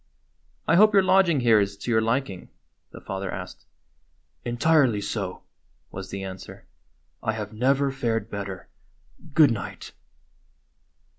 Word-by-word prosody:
"I -, -, +4 dB
hope 215 Hz, +2 st, +6 dB
your 195 Hz, -, +6 dB
lodging 185 Hz, -6 st, +4 dB
here 115 Hz, -3 st, +5 dB
is 100 Hz, -1 st, -1 dB
to 120 Hz, -, -4 dB
your 110 Hz, -1 st, +3 dB
liking?" 115 Hz, -4 st, -2 dB, 0.4 s
the -, -, -11 dB
father 95 Hz, 0 st, -5 dB
asked. -, -, -8 dB, 0.8 s
"Entirely 125 Hz, -2 st, +3 dB
so," 100 Hz, -3 st, -4 dB, 0.5 s
was 95 Hz, 0 st, -7 dB
the 100 Hz, 0 st, -5 dB
answer. 95 Hz, -1 st, -9 dB, 0.6 s
"I 110 Hz, -, -1 dB
have 105 Hz, -1 st, -6 dB
never 135 Hz, +4 st, +2 dB
fared 115 Hz, -5 st, -2 dB
better. 100 Hz, -2 st, -6 dB, 0.7 s
Good 155 Hz, -5 st, +7 dB
night." 105 Hz, -5 st, -6 dB
115 Hz, 130 wpm, -25 LUFS, 100-135 Hz, 0.8 s, Good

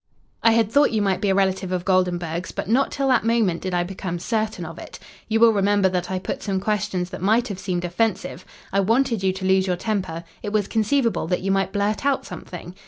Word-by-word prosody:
I 230 Hz, -, +5 dB
had 225 Hz, -2 st, +2 dB
thought 285 Hz, +3 st, +5 dB
you 220 Hz, -, 0 dB
might 190 Hz, -1 st, 0 dB
be 205 Hz, -, +1 dB
a 190 Hz, -, +3 dB
relative 190 Hz, -1 st, +1 dB
of 180 Hz, -1 st, -2 dB
Goldenburg's, 180 Hz, -2 st, 0 dB
but -, -, -5 dB
not 255 Hz, +6 st, +2 dB
till 275 Hz, -1 st, -1 dB
that 255 Hz, -3 st, +3 dB
moment 225 Hz, -7 st, +1 dB
did 185 Hz, -, -3 dB
I 175 Hz, -, +2 dB
become 180 Hz, -1 st, -5 dB
certain 215 Hz, +4 st, -2 dB
of -, -, -8 dB
it. -, -, -9 dB, 0.3 s
You 225 Hz, 0 st, +1 dB
will 230 Hz, 0 st, +6 dB
remember 200 Hz, -1 st, +3 dB
that 180 Hz, -1 st, -2 dB
I 190 Hz, -, -1 dB
put 185 Hz, -, -4 dB
some 195 Hz, -2 st, -1 dB
questions 190 Hz, -3 st, -1 dB
that -, -, -7 dB
might 225 Hz, +5 st, +2 dB
have 195 Hz, -2 st, -5 dB
seemed 180 Hz, -2 st, -2 dB
offensive. 180 Hz, -1 st, -1 dB, 0.3 s
I 195 Hz, -, +3 dB
wanted 230 Hz, +2 st, +2 dB
you 190 Hz, -1 st, +2 dB
to 190 Hz, 0 st, -5 dB
lose 190 Hz, 0 st, +3 dB
your 180 Hz, -, +1 dB
temper 185 Hz, -4 st, -3 dB, 0.2 s
it 205 Hz, -, -4 dB
was 210 Hz, -2 st, +1 dB
conceivable 230 Hz, -, +1 dB
that 180 Hz, +1 st, 0 dB
you 195 Hz, +1 st, -1 dB
might 195 Hz, -1 st, +1 dB
blurt 205 Hz, +3 st, -1 dB
out 280 Hz, -1 st, +1 dB
something. 175 Hz, 0 st, -8 dB
195 Hz, 235 wpm, -23 LUFS, 185-220 Hz, 0.3 s, will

